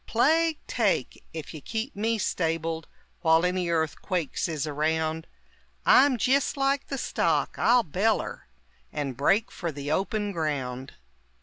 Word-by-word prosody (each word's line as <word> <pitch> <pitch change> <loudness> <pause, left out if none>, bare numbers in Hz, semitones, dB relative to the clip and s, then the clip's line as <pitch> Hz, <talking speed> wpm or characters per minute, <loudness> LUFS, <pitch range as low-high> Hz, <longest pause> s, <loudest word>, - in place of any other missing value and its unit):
Plague 315 +6 +3
take! - - 0
ef 160 -1 -6
you 155 - -8
keep 225 - -4
me 225 +3 0
stabled 165 -4 -1 0.3
While 165 0 +4
any 180 -1 0
earthquakes 165 +1 -1
is 155 -3 -2
around! 160 +2 -1 0.6
I'm 265 -1 +6
jist 270 +5 +2
like 275 0 +1
the 275 - -3
stock, - - 0
I'll 245 0 +5
beller, 195 +7 -1 0.4
And 140 -4 -3
break 195 - +2
fer 170 -3 -4
the 145 0 -5
open 205 +4 0
ground! 135 -6 -3
170 Hz, 130 wpm, -27 LUFS, 155-230 Hz, 0.6 s, I'm